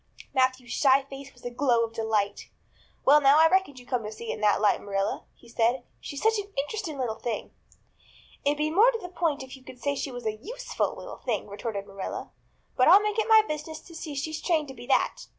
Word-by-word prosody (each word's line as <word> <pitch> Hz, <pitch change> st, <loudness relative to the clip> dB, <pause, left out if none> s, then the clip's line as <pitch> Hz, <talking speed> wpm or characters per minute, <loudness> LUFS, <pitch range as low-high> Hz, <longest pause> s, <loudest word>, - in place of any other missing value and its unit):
Matthew's 255 Hz, -2 st, +1 dB
shy 270 Hz, +1 st, +4 dB
face 275 Hz, 0 st, -10 dB
was 245 Hz, -, -19 dB
a 245 Hz, -, -3 dB
glow 240 Hz, -2 st, +2 dB
of 225 Hz, 0 st, -4 dB
delight. 215 Hz, -3 st, -1 dB, 0.6 s
"Well 295 Hz, +2 st, +7 dB
now, 275 Hz, +1 st, +6 dB
I 325 Hz, -, +8 dB
reckoned 370 Hz, -6 st, +1 dB
you'd 245 Hz, -1 st, -13 dB
come 250 Hz, -2 st, 0 dB
to 210 Hz, -1 st, -6 dB
see 225 Hz, +1 st, -6 dB
it -, -, -1 dB
in 215 Hz, -, -8 dB
that 210 Hz, -1 st, +3 dB
light, 210 Hz, -1 st, +3 dB
Marilla," 195 Hz, -1 st, -2 dB
he 240 Hz, -, -20 dB
said. 235 Hz, +2 st, +1 dB, 0.2 s
"She's 285 Hz, -, -7 dB
such 445 Hz, -1 st, +3 dB
an 405 Hz, 0 st, -7 dB
interesting 315 Hz, +2 st, -3 dB
little 235 Hz, -4 st, -3 dB
thing." 230 Hz, -3 st, -4 dB, 0.9 s
"It'd 290 Hz, +1 st, +1 dB
be 305 Hz, +1 st, 0 dB
more 420 Hz, +9 st, +6 dB
to 485 Hz, -, -1 dB
the 360 Hz, -4 st, -8 dB
point 330 Hz, -6 st, -1 dB
if 260 Hz, 0 st, -10 dB
you 265 Hz, -, -16 dB
could 250 Hz, -, -12 dB
say 285 Hz, +2 st, 0 dB
she 280 Hz, -, -3 dB
was 245 Hz, -2 st, -8 dB
a 215 Hz, 0 st, -1 dB
useful -, -, -3 dB
little -, -, -8 dB
thing," 230 Hz, -5 st, -2 dB
retorted 200 Hz, 0 st, -5 dB
Marilla, 195 Hz, -1 st, -6 dB, 0.4 s
"but 255 Hz, -, +4 dB
I'll 385 Hz, +5 st, +8 dB
make 425 Hz, +1 st, 0 dB
it 440 Hz, +1 st, 0 dB
my 440 Hz, -1 st, +8 dB
business 305 Hz, +1 st, -5 dB
to 340 Hz, -, -15 dB
see 320 Hz, -2 st, -6 dB
she's 315 Hz, +3 st, -3 dB
trained 315 Hz, -5 st, +1 dB
to -, -, -7 dB
be 245 Hz, -1 st, -11 dB
that. -, -, +1 dB
270 Hz, 235 wpm, -27 LUFS, 235-320 Hz, 0.9 s, I